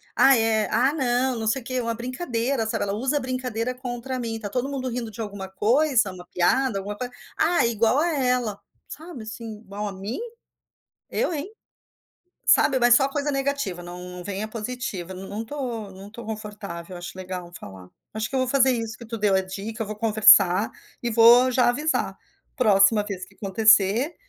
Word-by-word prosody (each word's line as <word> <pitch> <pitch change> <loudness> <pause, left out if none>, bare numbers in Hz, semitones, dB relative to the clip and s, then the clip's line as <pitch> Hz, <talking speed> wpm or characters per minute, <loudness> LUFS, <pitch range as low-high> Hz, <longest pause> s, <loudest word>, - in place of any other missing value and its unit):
“Ai, 270 -3 +6
é”. 220 -1 +1
“Ah, 255 +6 +3
não, 255 -3 +1
não 220 - -3
sei 245 +5 +1
o - - -18
quê”. 255 0 -2
Uma 230 -1 -2
brincadeira, 250 -1 -2
sabe? - - -1
Ela 200 - -2
usa 265 +7 0
brincadeira 255 -2 -3
contra 250 +1 -5
mim. 230 -2 -3
Está 220 -2 -5
todo 250 +5 -2
mundo 270 -2 -3
rindo 235 -2 -4
de 215 - -13
alguma 200 -3 -6
coisa, 235 +2 +2
uma 180 -1 -11
piada, 200 +7 +1
alguma-co 205 +5 -5 0.3
“Ah, 345 -3 +3
igual 230 +1 +2
a 330 - +2
ela”, 250 -6 0 0.3
sabe, 315 -6 -9
assim 220 0 -8
“Igual 210 0 -5
a - - -4
mim? 195 - -5 0.9
Eu - - 0
hein!”. 305 +6 -4 1.0
Sabe? 270 - +5
Mas 240 -1 +6
só 270 +2 +4
coisa 290 +1 -2
negativa. 275 -10 -2
Não 175 0 -8
não 180 0 -8
vem 200 +1 -4
a 215 - -4
positiva. 215 -5 -5
Não 190 +1 -8
não 210 +2 -4
estou 235 -5 -5
não 190 +1 -11
estou 225 +1 -10
confortável. 205 -5 -7
Acho 175 +1 -8
legal 185 -1 -6
eu 175 - -16
falar. 95 - -11 0.3
Acho 220 0 -2
que - - -8
eu - - +2
vou 255 - 0
fazer 265 0 +4
isso 225 -2 -4
que 235 - -10
tu 230 +1 -5
deu 205 -2 +2
a 190 - +4
dica. 195 +4 -5
Eu - - -5
vou 215 +1 -6
conversar 210 -3 +5 0.3
e 240 - -1
vou 235 +3 +7
já 250 -1 +3
avisar: 300 +6 -1 0.4
“Próxima 210 -2 +5
vez 195 -3 -5
que - - -22
acontecer, 215 - +3
225 Hz, 195 wpm, -24 LUFS, 200-255 Hz, 1.0 s, vou